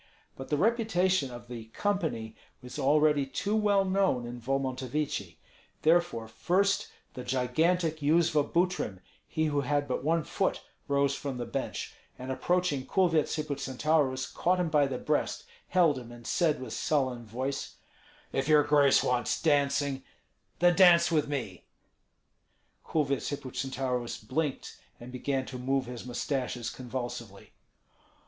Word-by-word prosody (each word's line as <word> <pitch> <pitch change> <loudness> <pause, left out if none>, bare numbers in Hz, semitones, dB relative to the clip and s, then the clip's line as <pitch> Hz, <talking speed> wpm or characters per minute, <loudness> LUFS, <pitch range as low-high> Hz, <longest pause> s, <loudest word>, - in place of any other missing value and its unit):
But 135 - -8
the 150 - +1
reputation 190 - +2
of 120 -1 -10
the 120 -2 -7
"company" 115 - -2 0.3
was 125 +4 -7
already 150 +1 +4
too 205 +9 -1
well 205 -2 +3
known 190 -10 +1
in 120 0 -7
Volmontovichi; 135 +2 -2 0.5
therefore 160 -9 +2
first 185 - +1 0.3
the 125 - -7
gigantic 155 +7 +1
Yuzva 155 0 +3
Butrym, 175 - 0 0.3
he 160 - 0
who 145 -2 +1
had 145 +1 0
but 130 - -2
one 165 +2 +2
foot, - - -1 0.2
rose 140 0 +2
from 140 -2 -4
the 120 - -3
bench, 115 - -4 0.2
and 130 +1 -5
approaching 165 -1 0
Kulvyets 170 -5 +2
Hippocentaurus, 140 -2 0
caught 180 +1 +1
him 175 -2 0
by 150 -2 +3
the 130 -2 -3
breast, - - -1 0.2
held 170 -7 +3
him, 120 -1 -11
and 120 -1 -12
said 165 -5 +1
with 130 - -6
sullen 130 -5 0
voice, 130 +5 -4 0.6
"If 135 +1 0
your 150 -1 +6
grace 145 -2 +4
wants 125 -1 0
dancing, 140 -3 +1 0.5
then 175 0 +4
dance 175 -3 +6
with 155 -3 +2
me." 125 -11 -4 1.2
Kulvyets 140 -4 -1
Hippocentaurus 130 -2 -3
blinked, 135 +6 -3 0.2
and 120 +1 -10
began 130 +1 -2
to 130 -1 -7
move 135 +1 0
his 125 0 -8
mustaches 125 -2 -2
convulsively. 120 -5 -6
140 Hz, 135 wpm, -29 LUFS, 125-160 Hz, 1.2 s, your